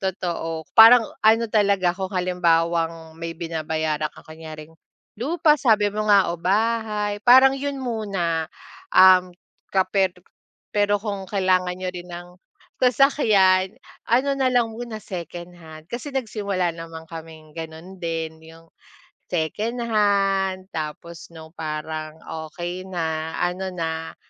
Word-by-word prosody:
Totoo, 170 Hz, -4 st, -3 dB, 0.2 s
parang 230 Hz, +2 st, +10 dB, 0.2 s
ano 225 Hz, +1 st, +5 dB
talaga 200 Hz, -4 st, +3 dB
kung 190 Hz, +2 st, -4 dB
halimbawang 165 Hz, -2 st, 0 dB
may 165 Hz, 0 st, -5 dB
binabayaran 160 Hz, -2 st, -2 dB
kang -, -, -14 dB
kunyaring 155 Hz, -1 st, -10 dB, 0.5 s
lupa 305 Hz, +4 st, +2 dB
sabi 210 Hz, -5 st, +3 dB
mo 215 Hz, +1 st, -3 dB
nga 200 Hz, -4 st, +5 dB
o 170 Hz, -, -4 dB
bahay 210 Hz, +2 st, 0 dB
parang 260 Hz, +2 st, +8 dB
yun 280 Hz, -1 st, -4 dB
muna, 195 Hz, -9 st, -2 dB, 0.5 s
um, 185 Hz, -1 st, +6 dB, 0.4 s
ka 190 Hz, -, +5 dB
per 190 Hz, -2 st, +2 dB, 0.6 s
pero 205 Hz, -1 st, +1 dB
kung 200 Hz, -3 st, -4 dB
kailangan 185 Hz, -2 st, +1 dB
niyo 185 Hz, 0 st, -4 dB
rin 180 Hz, -1 st, -9 dB
ng 175 Hz, 0 st, -9 dB, 0.5 s
sasakyan, 215 Hz, -8 st, +3 dB, 0.3 s
ano 275 Hz, +4 st, +2 dB
nalang 245 Hz, -3 st, +2 dB
muna 225 Hz, -1 st, -7 dB
secondhand 170 Hz, -3 st, -9 dB
kasi 265 Hz, +4 st, -6 dB
nagsimula 200 Hz, -8 st, -1 dB
naman 165 Hz, -1 st, -9 dB
kaming 160 Hz, -1 st, -10 dB
ganun 165 Hz, +4 st, -9 dB
din, 165 Hz, -2 st, -4 dB
yung 165 Hz, +1 st, -16 dB, 0.6 s
secondhand 200 Hz, 0 st, 0 dB
tapos 160 Hz, +2 st, -6 dB
nung 160 Hz, -1 st, -13 dB
parang 155 Hz, -1 st, -5 dB, 0.3 s
okay 180 Hz, +3 st, -6 dB
na, 160 Hz, -3 st, -3 dB
ano 180 Hz, +2 st, -2 dB
na, 160 Hz, -3 st, -4 dB
185 Hz, 120 wpm, -23 LUFS, 165-210 Hz, 0.6 s, parang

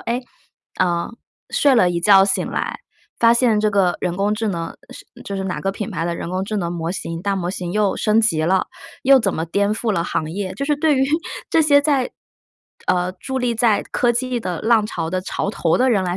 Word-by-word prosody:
诶， 235 Hz, +2 st, -2 dB, 0.6 s
呃， 175 Hz, -2 st, +1 dB, 0.4 s
睡 285 Hz, -2 st, +3 dB
了 230 Hz, -8 st, +4 dB
一 175 Hz, -1 st, -1 dB
觉 195 Hz, +1 st, +6 dB
醒 195 Hz, -, 0 dB
来， -, -, -3 dB, 0.4 s
发 230 Hz, 0 st, +6 dB
现 235 Hz, -3 st, +3 dB
这 215 Hz, -, +2 dB
个 190 Hz, -3 st, +2 dB
人 175 Hz, -1 st, -2 dB
工 205 Hz, +2 st, +1 dB
智 220 Hz, 0 st, -2 dB
能 170 Hz, -3 st, -4 dB
是 -, -, -12 dB, 0.2 s
就 200 Hz, -, -5 dB
是 190 Hz, -, -3 dB
哪 180 Hz, -5 st, -3 dB
个 195 Hz, -, -1 dB
品 200 Hz, 0 st, -5 dB
牌 165 Hz, -, -3 dB
的 170 Hz, 0 st, -2 dB
人 -, -, -5 dB
工 185 Hz, +2 st, -2 dB
智 215 Hz, +2 st, -3 dB
能 175 Hz, -3 st, -2 dB
模 165 Hz, -1 st, -3 dB
型， 165 Hz, -2 st, -5 dB
大 200 Hz, -1 st, 0 dB
模 175 Hz, -2 st, -2 dB
型 180 Hz, -2 st, -4 dB
又 205 Hz, +1 st, +1 dB
升 215 Hz, +1 st, +2 dB
级 165 Hz, -8 st, +1 dB
了， 185 Hz, +3 st, +2 dB, 0.4 s
又 270 Hz, 0 st, +6 dB
怎 195 Hz, -5 st, 0 dB
么 160 Hz, -, -2 dB
颠 200 Hz, +4 st, +1 dB
覆 220 Hz, 0 st, -1 dB
了 170 Hz, -, 0 dB
行 155 Hz, -2 st, -2 dB
业， 190 Hz, 0 st, -4 dB
就 275 Hz, -, -3 dB
是 295 Hz, +1 st, +1 dB
对 295 Hz, -1 st, +2 dB
于 265 Hz, -, +3 dB, 0.4 s
这 325 Hz, -, +3 dB
些 285 Hz, -1 st, +5 dB
在， 285 Hz, -4 st, +1 dB, 0.8 s
呃， 180 Hz, 0 st, +1 dB
伫 265 Hz, +5 st, -4 dB
立 245 Hz, -1 st, 0 dB
在 220 Hz, -3 st, +3 dB
科 240 Hz, -1 st, +2 dB
技 250 Hz, +1 st, -1 dB
的 180 Hz, -6 st, -4 dB
浪 220 Hz, -2 st, +3 dB
潮 165 Hz, -5 st, -4 dB
的 185 Hz, -, -1 dB
潮 195 Hz, +1 st, -3 dB
头 165 Hz, -6 st, +1 dB
的 255 Hz, +1 st, +3 dB
人 200 Hz, -5 st, +2 dB
来 175 Hz, 0 st, -2 dB
200 Hz, 250 characters per minute, -20 LUFS, 180-235 Hz, 0.8 s, 觉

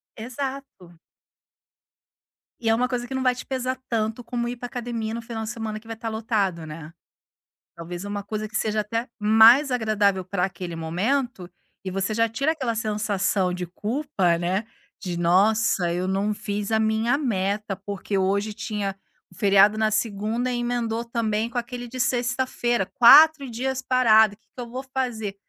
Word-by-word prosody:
Exato. 250 Hz, -, -7 dB, 1.6 s
E 230 Hz, -, -1 dB
é 225 Hz, -, +4 dB
uma 250 Hz, +2 st, +1 dB
coisa 245 Hz, -1 st, -3 dB
que 265 Hz, -, -7 dB
não 265 Hz, -, -1 dB
vai 255 Hz, -1 st, +3 dB
te 250 Hz, -, -8 dB
pesar 260 Hz, -1 st, -2 dB
tanto 225 Hz, +1 st, -2 dB
como 240 Hz, 0 st, -3 dB
ir 245 Hz, +1 st, -4 dB
para 245 Hz, -, -7 dB
academia 235 Hz, -3 st, -4 dB
no 235 Hz, -, -4 dB
final 230 Hz, -1 st, -6 dB
de 220 Hz, -, -5 dB
semana 225 Hz, -3 st, -5 dB
que 220 Hz, -, -25 dB
vai 225 Hz, -, -5 dB
estar 225 Hz, 0 st, -5 dB
lotado, 215 Hz, -6 st, -1 dB
né. 155 Hz, 0 st, -9 dB, 0.8 s
Talvez 175 Hz, +2 st, -7 dB
uma 205 Hz, 0 st, -4 dB
coisa 215 Hz, +1 st, -4 dB
que 215 Hz, -, -12 dB
seja 215 Hz, -1 st, 0 dB
até 230 Hz, +3 st, -3 dB
mais 225 Hz, +6 st, +6 dB
agradável 210 Hz, -5 st, +1 dB
para 185 Hz, 0 st, -1 dB
aquele 180 Hz, -3 st, -6 dB
momento, 185 Hz, +5 st, -2 dB, 0.3 s
e 190 Hz, -, -4 dB
você 195 Hz, +3 st, -2 dB
já 230 Hz, +1 st, +2 dB
tira 275 Hz, +8 st, 0 dB
aquela 260 Hz, -8 st, -2 dB
sensação 210 Hz, -3 st, 0 dB
de 180 Hz, 0 st, -4 dB
culpa, 205 Hz, -, -1 dB
né, 185 Hz, +5 st, -1 dB, 0.4 s
de: 175 Hz, -2 st, -4 dB
"Nossa 190 Hz, +1 st, +2 dB
eu 180 Hz, +2 st, -2 dB
não 195 Hz, +2 st, 0 dB
fiz 205 Hz, 0 st, -4 dB
a 220 Hz, -, +3 dB
minha 220 Hz, +4 st, +1 dB
meta, 205 Hz, -6 st, -1 dB
porque 200 Hz, +1 st, -4 dB
hoje 200 Hz, +3 st, 0 dB
tinha 210 Hz, -3 st, -3 dB, 0.4 s
o -, -, -17 dB
feriado 200 Hz, +2 st, +5 dB
na 220 Hz, 0 st, +3 dB
segunda 215 Hz, +3 st, -1 dB
emendou 240 Hz, -1 st, -1 dB
também 230 Hz, -1 st, -1 dB
com 240 Hz, -, -6 dB
aquele 245 Hz, 0 st, -4 dB
de 255 Hz, +2 st, -8 dB
sexta-feira, 245 Hz, -3 st, 0 dB
4 280 Hz, +7 st, +7 dB
dias 260 Hz, +3 st, -2 dB
parado, 220 Hz, -5 st, +4 dB
que 220 Hz, -, -41 dB
que 250 Hz, -, -10 dB
eu 240 Hz, -, -7 dB
vou 255 Hz, +3 st, -5 dB
fazer?" 225 Hz, -6 st, -2 dB
220 Hz, 170 wpm, -24 LUFS, 200-240 Hz, 1.6 s, 4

